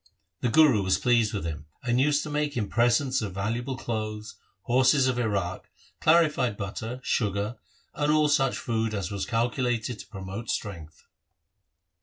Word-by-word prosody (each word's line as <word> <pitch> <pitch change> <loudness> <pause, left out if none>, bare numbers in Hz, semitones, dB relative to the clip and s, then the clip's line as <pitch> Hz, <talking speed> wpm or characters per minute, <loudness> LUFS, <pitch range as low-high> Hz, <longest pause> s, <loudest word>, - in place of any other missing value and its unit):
The 125 - 0
Guru 135 -4 +5
was 95 -1 +2
pleased 115 0 +2
with 100 -5 -3
him, 75 -2 -5 0.2
and 125 0 +2
used 145 +1 +2
to 155 - -6
make 150 -2 -1
him 105 -4 -1
presents 120 +3 +2
of 100 -4 -5
valuable 120 +6 -2
clothes, 110 -2 -4 0.3
horses 130 +2 +4
of 125 -1 0
Iraq, 100 -6 -2 0.3
clarified 155 -9 +3
butter, 110 +5 -5
sugar, 105 +1 -1 0.4
and 150 0 +1
all 155 0 +4
such 140 -3 +2
food 110 -2 -1
as 95 -2 -3
was 100 -1 -3
calculated 120 -1 -1
to - - -10
promote 95 +2 -7
strength. 85 -7 -5
115 Hz, 155 wpm, -27 LUFS, 100-130 Hz, 0.4 s, Guru